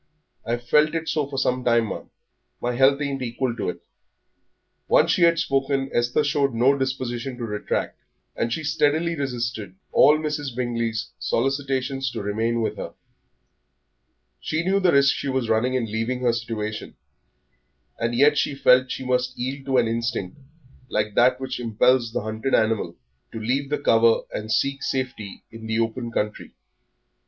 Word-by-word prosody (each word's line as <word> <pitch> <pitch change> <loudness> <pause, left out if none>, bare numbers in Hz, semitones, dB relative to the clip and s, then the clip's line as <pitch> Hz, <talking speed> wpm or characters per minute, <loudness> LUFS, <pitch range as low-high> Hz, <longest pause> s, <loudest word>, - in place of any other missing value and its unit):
I've 120 +1 -3
felt 150 +5 +4
it 165 0 -2
so 150 -3 0
for 140 -1 -6
some 125 -1 0
time, 115 -2 +2
ma'am. - - -7 0.5
My 120 0 -1
health 135 +2 +4
ain't 140 -2 -2
equal 120 0 -2
to - - -2
it." - - -6 1.1
Once - - +4
she - - +1
had 170 0 +5
spoken, 135 -1 0
Esther 120 +5 +2
showed 140 -3 +1
no 130 +4 +4
disposition 130 -1 -3
to 120 - -6
retract, 105 -2 -3 0.4
and 115 - -1
she 160 - -2
steadily 155 +3 +1
resisted 120 - -3 0.2
all 150 - +6
Mrs. 150 -4 -3
Bingley's 115 -2 -2
solicitations 135 +1 -1
to 115 - -4
remain 115 +3 0
with - - -2
her. - - -7 1.4
She 160 +2 -2
knew 195 +2 +2
the 185 -3 +3
risk 140 -1 +5
she 140 - -4
was 130 -3 -1
running 125 +4 +2
in 125 -3 0
leaving 115 +4 -2
her 120 -2 +2
situation, 110 -2 -4 1.0
and 115 +1 -1
yet 145 +3 +4
she 140 - 0
felt 130 -1 +4
she 130 - -4
must 125 0 0
yield 135 +2 -4
to 135 -1 +2
an 120 -2 +3
instinct 115 -4 -2 0.5
like 105 0 -1
that 125 +3 +4
which 130 -1 -4
impels 120 +1 +2
the - - -2
hunted 110 +4 -1
animal 110 -6 0 0.4
to 115 - -5
leave 135 +5 -1
the 150 - 0
cover 115 -4 +4
and 110 +1 -4
seek 140 +4 +1
safety 130 -7 -4
in 115 0 -9
the 110 0 -1
open 115 +1 -2
country. 105 -1 -3
125 Hz, 165 wpm, -24 LUFS, 115-135 Hz, 1.4 s, all